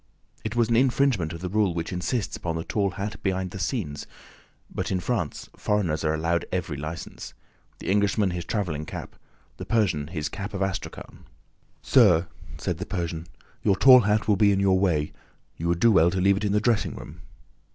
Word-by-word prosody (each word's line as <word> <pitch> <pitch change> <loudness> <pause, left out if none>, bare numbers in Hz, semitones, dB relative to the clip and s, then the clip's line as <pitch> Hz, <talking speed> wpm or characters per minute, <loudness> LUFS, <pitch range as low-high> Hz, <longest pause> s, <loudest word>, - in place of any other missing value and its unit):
It 110 +1 -4
was 120 -2 +3
an 115 - +3
infringement 125 - +2
of 85 -1 -7
the 90 - -3
rule 100 -3 +1
which 85 +2 -3
insists 100 +5 -2
upon 85 -1 -3
the 80 - -3
tall 100 +1 0
hat 100 +3 -5
behind 95 -2 -1
the 95 - -7
scenes; 90 - -3 0.7
but - - -3
in 95 - +1
France 95 -4 -3
foreigners 90 -7 0
are 75 0 +1
allowed 85 +2 0
every 85 -4 -2
license: 75 +4 -7 0.4
the - - -9
Englishman 100 -1 +2
his 90 -1 -4
traveling 85 -6 -3
cap, - - -7 0.4
the - - -6
Persian 90 -11 +1
his 80 -3 -3
cap 100 +1 -6
of 100 - -3
astrakhan. 95 -1 -6 0.6
"Sir," 95 -9 +5 0.3
said 90 -2 -3
the 95 - -4
Persian, 85 -3 -3 0.3
"your 100 - +3
tall 130 +5 +8
hat 105 -1 +1
will 105 -2 +3
be 100 0 +5
in 100 - +1
your 95 -1 +3
way: 80 -6 +1 0.5
you 85 - -3
would 85 0 +1
do 115 +4 +5
well 85 -4 +5
to 95 +1 -2
leave 95 +1 +4
it 105 - -2
in 100 - +1
the 105 - +3
dressing 115 0 +1
room." 80 +4 -10
95 Hz, 195 wpm, -25 LUFS, 85-105 Hz, 0.7 s, tall